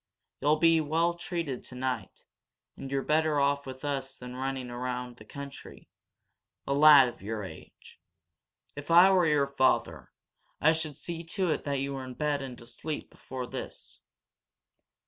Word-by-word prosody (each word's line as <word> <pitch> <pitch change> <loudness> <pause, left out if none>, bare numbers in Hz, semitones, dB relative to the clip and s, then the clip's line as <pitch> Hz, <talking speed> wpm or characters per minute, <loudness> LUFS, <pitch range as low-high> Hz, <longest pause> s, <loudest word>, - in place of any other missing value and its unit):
You'll 150 +2 +4
be 165 0 +4
well 165 +3 +1
treated 170 -6 -4
tonight, 125 -5 -5 0.5
and 135 - -8
you're 135 0 -1
better 155 -1 +2
off 140 0 +1
with 130 +2 -8
us 135 -2 -3
than 125 0 -9
running 130 -1 -3
around 125 0 -4
the 110 - -14
country 140 +3 -10 0.8
a 140 - 0
lad 145 -2 +8
of 120 - -8
your 110 +1 -4
age! 95 - -12 0.8
If 145 +2 -8
I 175 +3 +8
were 180 -3 +4
your 150 -2 +3
father, 140 -1 0 0.5
I 160 +3 +5
should 155 -3 -3
see 170 -1 -5
to 180 +1 0
it - - -2
that 140 -2 -1
you 140 0 -2
were 135 -1 -5
in 130 -1 -8
bed 150 -1 0
and 130 -3 -7
asleep 145 +6 -6
before 130 -1 -7
this." - - -8
140 Hz, 160 wpm, -29 LUFS, 130-155 Hz, 0.8 s, lad